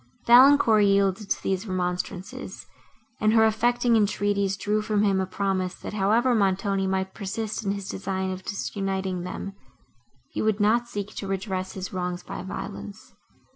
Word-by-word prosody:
Valancourt 240 -3 +7
yielded 195 0 +2
to - - -1
these 190 +2 -1
remonstrances, 180 0 -4 0.5
and 215 0 +3
her 220 -1 +6
affecting 240 +2 +2
entreaties 200 -2 +1
drew 210 +2 0
from 210 -1 +1
him 195 -2 +2
a 190 - -2
promise, 190 -1 -1
that, - - -8
however 220 +5 +2
Montoni 195 -2 +1
might 190 0 -1
persist 215 +2 -4
in 200 -1 0
his 200 -1 -6
design 190 0 -3
of 185 0 -5
disuniting 195 -2 -3
them, 190 +2 -6 0.8
he - - -3
would 215 -1 +1
not 230 +3 +3
seek 205 -3 -5
to 195 - -4
redress 190 -1 -3
his 190 0 -6
wrongs 180 -1 -3
by - - -6
violence. 100 - -8
195 Hz, 155 wpm, -25 LUFS, 190-215 Hz, 0.8 s, Valancourt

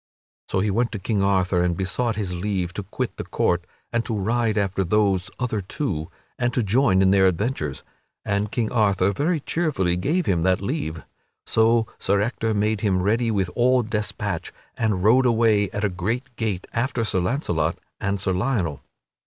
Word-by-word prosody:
So 95 - +1
he 105 +1 +1
went 120 +4 +1
to - - -2
King 100 +1 -1
Arthur 95 -2 +2
and 90 -1 0
besought 110 +5 -1
his 100 -4 -3
leave 90 -1 -2
to 105 - -4
quit 110 +5 -4
the - - -4
court 90 0 0 0.3
and 120 0 +1
to 115 - -2
ride 110 +2 0
after 95 -1 +1
those 95 0 +1
other 115 -5 -1
two 90 - -3 0.3
and 120 0 +1
to 125 - +2
join 100 -3 +3
in 95 - +4
their 95 -1 +5
adventures, 90 - -2 0.4
and 100 0 -1
King 115 -1 -1
Arthur 100 -4 +2
very 155 - 0
cheerfully 140 - 0
gave 160 - 0
him 90 - +1
that 95 +1 +2
leave. 100 - -3 0.4
So 115 +1 +3
Sir 100 +1 +2
Ector 110 0 -1
made 105 0 +1
him 95 -4 +1
ready 115 +4 +2
with 100 -4 0
all 125 +1 +3
despatch, 105 -1 -3 0.2
and 105 -5 0
rode 125 +5 +5
away 110 -4 +3
at 105 - -4
a - - +4
great 115 +9 -3
gait 105 -6 -2
after 120 0 0
Sir 95 -4 0
Launcelot 90 - 0 0.2
and 100 0 -1
Sir 95 - 0
Lionel. 90 - -1
105 Hz, 180 wpm, -23 LUFS, 95-115 Hz, 0.4 s, their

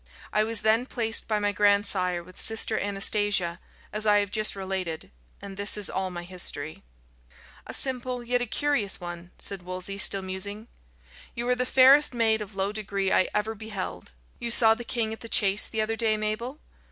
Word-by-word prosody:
I 215 - +3
was 225 -1 -1
then 225 +3 +2
placed 225 -3 0
by 215 - +1
my 205 0 0
grandsire 200 -4 +3
with 185 +1 -9
Sister 225 0 +1
Anastasia, 200 -3 0 0.3
as 215 +1 -2
I 205 0 +5
have 205 -1 0
just 215 -1 +1
related 190 - -4 0.3
and 195 -1 -8
this 205 +1 +1
is 205 - +1
all 190 0 -1
my 175 -1 -6
history." 175 -4 -2 0.9
"A - - -7
simple 250 -2 -3
yet 245 +1 0
a 245 - -2
curious 260 -6 0
one," 175 -1 -8
said 195 -2 -2
Wolsey, 185 +2 -5
still 195 0 +3
musing. 200 +4 -4 0.7
"You 235 +1 -3
are 250 - +3
the 250 0 -1
fairest 265 +1 +6
maid 220 -2 +2
of 205 -1 -8
low 195 +1 -1
degree 200 -2 -2
I 185 - +3
ever 210 +1 0
beheld. 195 - -7 0.3
You 235 - -3
saw 230 -1 +6
the 240 - -7
king 230 -2 -2
at 225 - -9
the 230 - -9
chase 200 -1 +3
the 220 - -2
other 220 +1 -1
day, 220 -1 +1
Mabel?" 215 +6 -3
210 Hz, 190 wpm, -26 LUFS, 190-225 Hz, 0.9 s, fairest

